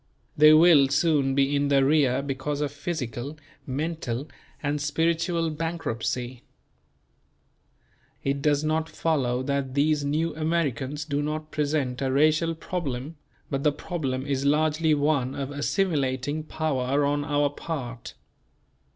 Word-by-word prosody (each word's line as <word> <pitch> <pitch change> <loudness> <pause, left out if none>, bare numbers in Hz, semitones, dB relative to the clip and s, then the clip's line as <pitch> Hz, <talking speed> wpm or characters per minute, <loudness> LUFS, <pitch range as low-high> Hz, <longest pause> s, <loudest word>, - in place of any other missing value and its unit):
They 150 +1 +7
will 155 -3 +7
soon 140 -2 +2
be 140 +1 +2
in 140 0 +1
the 135 -1 +4
rear 140 -3 +3
because 140 +1 -3
of 145 -2 -1
physical, 145 -2 -5 0.3
mental 140 -2 -3 0.4
and 145 0 -1
spiritual 165 +2 0
bankruptcy. 130 -6 -3 1.8
It 140 0 -1
does 145 0 +2
not 160 +1 0
follow 135 -6 0
that 140 -1 -2
these 150 +1 +2
New 155 +2 -1
Americans 150 -3 -1
do 145 -1 -1
not 155 +1 -4
present 145 -4 -1
a 135 -1 0
racial 155 +4 +3
problem; 155 -4 -4 0.3
but 135 -1 -1
the 150 - +4
problem 135 -4 -3
is 140 -1 -1
largely 155 +2 +2
one 145 -3 +1
of 140 0 -4
assimilating 145 -2 -1
power 145 -3 0
on 145 +1 0
our 145 -1 +1
part. 130 -6 -6
145 Hz, 125 wpm, -26 LUFS, 135-155 Hz, 1.8 s, They